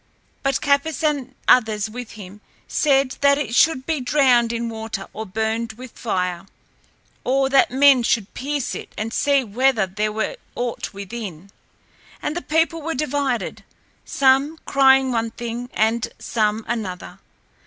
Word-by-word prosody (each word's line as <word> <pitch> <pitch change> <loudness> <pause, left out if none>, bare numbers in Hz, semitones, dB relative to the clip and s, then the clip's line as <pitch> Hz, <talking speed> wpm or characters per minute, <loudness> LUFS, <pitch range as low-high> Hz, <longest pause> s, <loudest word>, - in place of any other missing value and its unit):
But 275 -1 0
Capys, 285 +2 +1
and 280 -4 -1
others 220 -3 +4
with 240 +1 -8
him, 205 -1 -11 0.3
said 275 -3 +2
that 280 0 +5
it 290 -5 -3
should 260 0 +3
be 310 -3 -1
drowned 250 -4 +3
in 235 0 -2
water 220 -3 -5
or 220 0 -6
burned 220 +3 -2
with 250 +2 -11
fire, 180 -4 -3 0.8
or 270 +1 +2
that 270 0 +4
men 270 0 +5
should 225 -3 0
pierce 285 0 -3
it - - -8
and 220 +1 -3
see 280 -2 +2
whether 240 0 +2
there 210 +3 -2
were 220 - -3 0.2
aught 245 -1 -3
within. 200 -3 -8 0.7
And 295 - -3
the 350 - -2
people 325 +1 0
were 325 0 -3
divided, 275 -3 -2 0.4
some 275 +3 +2
crying 265 -1 +4
one 230 -1 0
thing 240 +1 -6
and 220 +1 +1
some 215 -1 -1
another. 190 -5 -5
245 Hz, 145 wpm, -22 LUFS, 220-275 Hz, 0.8 s, that